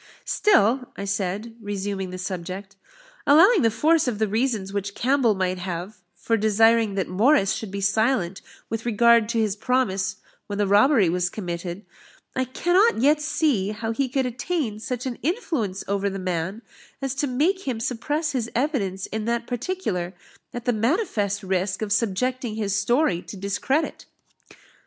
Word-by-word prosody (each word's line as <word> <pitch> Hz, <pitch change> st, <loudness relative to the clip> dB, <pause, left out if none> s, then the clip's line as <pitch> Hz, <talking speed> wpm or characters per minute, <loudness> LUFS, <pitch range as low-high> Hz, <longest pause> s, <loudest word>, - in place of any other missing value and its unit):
"Still," 260 Hz, -, +3 dB, 0.2 s
said 200 Hz, +1 st, -2 dB
I, -, -, -17 dB
resuming 200 Hz, -2 st, -3 dB
the 185 Hz, -, -6 dB
subject, 185 Hz, +1 st, -6 dB, 0.5 s
"allowing 350 Hz, +8 st, +7 dB
the 230 Hz, -, +4 dB
force 305 Hz, +7 st, +2 dB
of 235 Hz, -4 st, -1 dB
the 220 Hz, 0 st, +1 dB
reasons 215 Hz, -3 st, -1 dB
which 200 Hz, 0 st, -3 dB
Campbell 255 Hz, -4 st, +2 dB
might 185 Hz, -1 st, -1 dB
have 180 Hz, +3 st, -5 dB
for 225 Hz, +6 st, 0 dB
desiring 220 Hz, 0 st, +3 dB
that 190 Hz, -, -1 dB
Morris 210 Hz, +2 st, +3 dB
should 220 Hz, -, -5 dB
be 200 Hz, +1 st, -5 dB
silent 200 Hz, -2 st, +1 dB, 0.3 s
with 225 Hz, 0 st, -4 dB
regard 235 Hz, 0 st, +4 dB
to 235 Hz, -1 st, 0 dB
his 215 Hz, -3 st, +1 dB
promise 215 Hz, -5 st, 0 dB, 0.3 s
when 205 Hz, -, -4 dB
the 205 Hz, -, +2 dB
robbery 205 Hz, -, +5 dB
was 180 Hz, +1 st, 0 dB
committed, 175 Hz, 0 st, -5 dB, 0.5 s
I 260 Hz, -, +1 dB
cannot 355 Hz, -, +2 dB
yet 295 Hz, +6 st, +3 dB
see 290 Hz, -10 st, +1 dB
how 225 Hz, +1 st, -3 dB
he 260 Hz, +3 st, -1 dB
could 265 Hz, +1 st, 0 dB
attain 250 Hz, -2 st, -2 dB
such 250 Hz, +2 st, -4 dB
an 250 Hz, -2 st, -4 dB
influence 270 Hz, -, -2 dB
over 200 Hz, 0 st, 0 dB
the 195 Hz, -, -5 dB
man, 185 Hz, +3 st, -3 dB, 0.4 s
as 270 Hz, -1 st, -2 dB
to 290 Hz, 0 st, 0 dB
make 320 Hz, +9 st, 0 dB
him 245 Hz, -4 st, -1 dB
suppress 290 Hz, +8 st, -1 dB
his 240 Hz, -4 st, -2 dB
evidence 225 Hz, -, -1 dB
in 215 Hz, 0 st, -4 dB
that 235 Hz, 0 st, -1 dB
particular, 240 Hz, -, -3 dB, 0.4 s
at 240 Hz, -1 st, -7 dB
the 245 Hz, -, +2 dB
manifest 220 Hz, -, 0 dB
risk 190 Hz, +2 st, -1 dB
of 205 Hz, -1 st, 0 dB
subjecting 235 Hz, +3 st, -1 dB
his 205 Hz, -2 st, -1 dB
story 205 Hz, -, +2 dB
to 200 Hz, -, -10 dB
discredit." 200 Hz, +10 st, -1 dB
220 Hz, 160 wpm, -24 LUFS, 195-260 Hz, 0.5 s, allowing